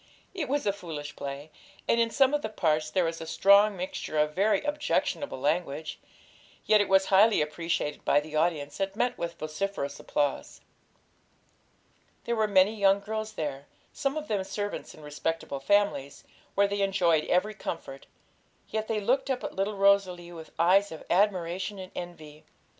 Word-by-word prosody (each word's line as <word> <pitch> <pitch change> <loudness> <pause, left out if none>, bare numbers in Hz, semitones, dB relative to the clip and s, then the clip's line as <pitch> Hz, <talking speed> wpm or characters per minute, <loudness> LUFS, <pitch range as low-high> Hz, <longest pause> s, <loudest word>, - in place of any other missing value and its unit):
It 345 -8 -3
was 285 +1 0
a 200 - +2
foolish 155 -7 -7
play, 140 +2 -7 0.4
and 235 - +3
in 230 - +2
some 270 +3 +3
of 295 - +1
the 220 - -3
parts 155 -6 0
there 185 +2 +1
was 165 0 -3
a 160 - -6
strong 200 +4 +5
mixture 180 -3 -4
of 150 0 +2
very 200 +6 +2
objectionable 295 - -1
language; 155 +1 -2 0.7
yet 215 -1 +5
it 205 - -1
was 190 0 +5
highly 210 +3 +6
appreciated 150 -1 -2
by 145 - +4
the 155 +1 -8
audience, 155 -2 0
and 195 0 -2
met 245 +3 0
with 170 0 -5
vociferous 155 -2 -4
applause. 145 -2 -2 1.6
There 235 - -1
were 220 -1 +2
many 200 +1 +4
young 200 -1 +4
girls 215 +1 -4
there, 145 -4 -4 0.3
some 275 +2 -1
of 305 0 -4
them 205 -3 0
servants 205 +1 -5
in 155 - -14
respectable 150 -1 -3
families, 170 -3 +1 0.3
where 200 0 +4
they 200 0 -2
enjoyed 175 -5 +2
every 195 +4 +1
comfort; 150 -8 -7 0.6
yet 220 0 -2
they 220 -1 0
looked 265 +6 +1
up 260 -2 -1
at - - -5
little 200 +2 -1
Rosalie 195 -3 +2
with 165 -2 -10
eyes 190 +5 +4
of 160 - -8
admiration 185 0 +1
and 185 -1 -8
envy. 155 -4 -9
190 Hz, 170 wpm, -28 LUFS, 155-210 Hz, 1.6 s, highly